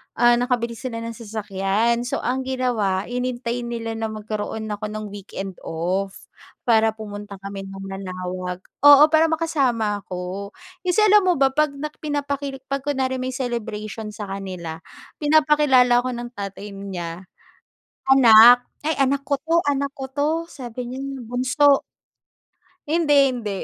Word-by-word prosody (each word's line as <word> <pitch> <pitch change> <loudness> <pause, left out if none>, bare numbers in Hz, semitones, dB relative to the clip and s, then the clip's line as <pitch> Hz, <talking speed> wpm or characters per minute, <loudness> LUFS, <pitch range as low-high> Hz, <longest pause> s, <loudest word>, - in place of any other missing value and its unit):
ah, 240 0 +4
nakabili 240 -2 -1
sila 230 -3 -5
ng 230 - -4
sasakyan. 220 +1 -1
So, - - -3
ang 260 +1 -1
ginawa 230 -7 0
hinintay 245 0 -3
nila 230 -1 -4
na 225 - -1
magkaroon 215 0 -5
ako 210 +1 -4
ng 215 0 -5
weekend 195 -2 -7
off 185 +4 -2 0.5
para 220 -2 +3
pumunta 205 -2 -8
kami 195 0 -6
ng 195 0 -9
Manaoag, 185 -1 -5 0.3
oo, 290 0 +10
para 315 +1 +4
makasama 265 -11 0
ako. 185 +2 -6 0.3
Kasi, 360 +4 +2
alam 420 -1 +6
mo 360 - +5
ba, 270 -1 +3
'pag 300 0 +1
na 300 +2 -4
pinapakil 285 -2 -3
'pag 275 0 -2
kunwari 260 -2 -1
may 255 0 -3
celebration 220 -3 -4
sa 205 -2 -6
kanila, 185 -5 -6 0.4
pinapakilala 295 -5 +4
ako 255 0 -3
ng 240 0 -6
tatay 200 +1 -6
niya. 185 -3 -6 0.9
Anak. 245 -1 +8 0.2
"Ay, 315 +1 0
anak 275 +1 +2
ko 280 0 0
'to. 330 +3 +2
Anak 280 0 -1
ko 265 - -5
'to", 285 +2 0 0.2
sabi 245 -1 -7
niya, 260 - -6 0.2
"bunso." 255 +4 +3 1.1
Hindi 315 -1 +2 0.2
hindi. 235 -4 -4
235 Hz, 140 wpm, -22 LUFS, 205-270 Hz, 1.1 s, oo